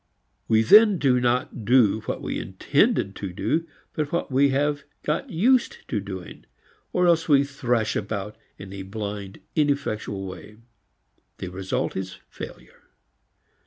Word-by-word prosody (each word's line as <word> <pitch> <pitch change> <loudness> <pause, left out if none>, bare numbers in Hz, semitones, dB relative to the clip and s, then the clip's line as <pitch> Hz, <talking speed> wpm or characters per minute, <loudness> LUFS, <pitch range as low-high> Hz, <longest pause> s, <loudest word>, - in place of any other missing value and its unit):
We 110 0 +4
then 210 - +7
do 130 -5 +3
not 125 -1 0
do 115 -2 +4
what - - -3
we - - -2
intended 95 - +1
to 100 -3 -5
do 165 - -1 0.3
but 150 -2 -2
what 170 -4 -2
we 140 +2 +4
have 145 +2 +1 0.2
got 150 +1 -1
used 240 +9 +2
to 105 - 0
doing, 95 -3 -8 0.4
or 180 - +2
else 170 -2 +3
we 140 -1 +6
thrash 125 -5 -1
about 105 0 -3 0.2
in 95 -1 -10
a 100 - -6
blind 100 0 -6
ineffectual 140 -10 -1
way. 95 +3 -9 0.8
The 90 - -5
result 95 +1 -3
is 95 0 -5
failure. - - -10
120 Hz, 140 wpm, -25 LUFS, 100-145 Hz, 0.8 s, then